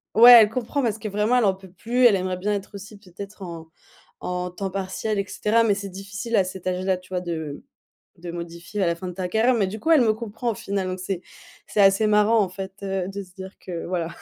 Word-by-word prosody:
ouais, 240 +2 +10
elle 210 - +4
comprend 255 +5 -2
parce 225 -4 0
que 215 -1 -5
vraiment, 210 +5 +1
elle 235 - +3
en 195 - +3
peut 190 -1 -15
plus. 240 +7 0
Elle 220 -5 +7
aimerait 185 -1 -2
bien 205 +3 -1
être 200 -1 -4
aussi 205 +2 -10
peut-être 200 +1 -11
en 170 -3 -8 0.5
en 180 0 -3
temps 190 +2 -5
partiel, 195 +2 -3
et 200 - -2
cetera, 220 +3 +1
mais 210 -3 +2
c'est 200 -1 -6
difficile 200 +5 -5
à 195 - +5
cet 185 0 -8
âge-là, 185 +1 0
tu 185 0 -18
vois? 180 -1 -2
De 160 -5 -5 0.6
de 170 0 -7
modifier 170 +3 -5
à - - +3
la 170 - 0
fin 185 +2 -7
de 180 - -5
ta 180 0 -4
carrière, 225 +6 +3
mais 200 -5 +1
du 215 +3 -6
coup, 330 - -1
elle 315 - +6
me 220 -2 +3
comprend, 230 +2 -4
au - - -2
final, 195 -1 -3
donc, 185 0 -4
c'est 185 -1 -4 0.5
c'est 210 - 0
assez 195 +2 +5
marrant, 210 +2 +4
en 195 - +1
fait, 190 +1 -7
heu, 190 -2 -2
de 200 +1 -5
se 185 -2 -17
dire 190 0 -9
que, 170 -2 -6
voilà, 170 -2 -2
195 Hz, 255 wpm, -24 LUFS, 185-215 Hz, 0.6 s, ouais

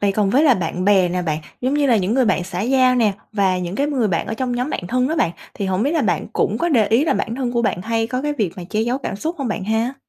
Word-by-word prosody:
vậy 200 -1 +2
còn 200 -1 +1
với 275 +8 +4
là 275 -6 +5
bạn 180 +1 -3
bè 195 -3 +4
nè 180 +1 -2
bạn, 155 -3 -1 0.2
giống 255 +3 0
như 290 -1 +2
là 240 -4 +4
những 200 +4 0
người 265 - +3
bạn 190 -5 +1
xã 180 0 -5
giao 255 +3 +3
nè 225 -5 +3 0.2
và 190 -3 +1
những 180 0 -4
cái 280 - +1
người 260 -7 0
bạn 170 -3 -1
ở 220 - -3
trong 250 +1 -2
nhóm 250 +5 -2
bạn 175 - -4
thân 255 +3 +1
đó 320 - -1
bạn, 170 - +2 0.2
thì 200 - -3
hổng 190 +2 0
biết 285 - +1
là 325 - +1
bạn - - 0
cũng - - 0
có 345 - +1
để 230 -9 +3
ý 230 +8 +3
là - - +1
bản 230 - -2
thân 250 -2 -2
của 235 -1 +1
bạn 180 -5 -1
hay 225 +1 0
có 255 +2 -3
cái 295 0 -1
việc 210 - -1
mà 180 - -7
che 215 - 0
giấu 240 +4 0
cảm 235 - -5
xúc 320 - -3
hông 270 -4 -2
bạn 210 -2 -3
ha? 225 +5 0
225 Hz, 325 wpm, -20 LUFS, 195-260 Hz, 0.2 s, là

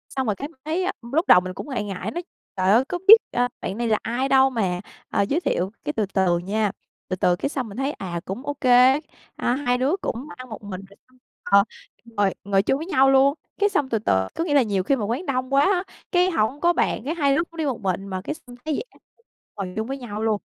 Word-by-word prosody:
Xong 265 -2 -1
rồi 210 - +1
cái 285 - -5
mình 300 -4 -23
thấy 325 +4 -1
á, 375 - 0 0.2
lúc 325 +5 +1
đầu - - +8
mình 185 0 -6
cũng 290 - -8
ngại 255 -6 -2
ngại 200 +1 -5
nói: 345 - -4 0.3
"Trời 185 +1 +3
ơi, 245 +5 +5
có 355 - -3
biết, 435 - +13 0.2
a, 245 0 +1
bạn 195 - -4
này 235 0 -1
là 215 -1 +3
ai 250 +4 -1
đâu 265 0 +5
mà, 190 -8 -1 0.3
ơ, - - +1
giới 275 +11 +1
thiệu." 190 - -1
Cái 295 - -2
từ 220 -5 0
từ 185 -3 +3
nha, 205 +3 -1 0.4
từ 185 - -2
từ 180 -1 +2
cái 275 - -2
xong 260 -5 -3
mình 200 - -10
thấy, 270 +2 0
à, 175 -9 -5
cũng 220 +9 -6
ô 290 - -2
kê, 255 +2 +6 0.4
à, 245 - 0
hai 250 -3 0
đứa 270 +7 +1
cũng 255 -2 -4
ăn 255 -1 -10
một 215 - -8
mình, 190 -2 -6
rồi 200 - -19
xong, 255 - -26 0.3
ờ, 200 0 +5 0.4
ngồi 205 -4 0
ngồi 195 -1 +2
chung 270 - +1
với 315 - -5
nhau 270 -7 +4
luôn. 270 +1 +5 0.3
Cái 410 - +3
xong 285 -9 0
từ 225 -3 0
từ 95 - +1
có - - -1
nghĩa 320 -4 -1
là 280 - +6
nhiều 200 -5 0
khi 275 - +2
mà 220 -6 -2
quán 245 - -2
đông 255 -2 -2
quá 275 - +5
á, 370 +1 +2 0.3
cái 360 0 +3
hổng 270 0 0
có 345 0 +4
bàn, - - 0
cái 315 +4 -2
hai 280 -4 +2
đứa 330 - +2
cũng 335 0 -17
đi 320 - -1
một 255 -6 -2
mình, 195 0 -2
mà 185 -1 -4
cái 300 - -4
xong 245 -4 -14
thấy 310 - -1
vậy 455 - -3
á, - - -24 0.6
ngồi 185 -2 -5
chung 220 +2 -2
với 270 +1 -4
nhau 215 -4 -6
luôn. 215 -2 +1
245 Hz, 270 wpm, -23 LUFS, 200-285 Hz, 0.6 s, biết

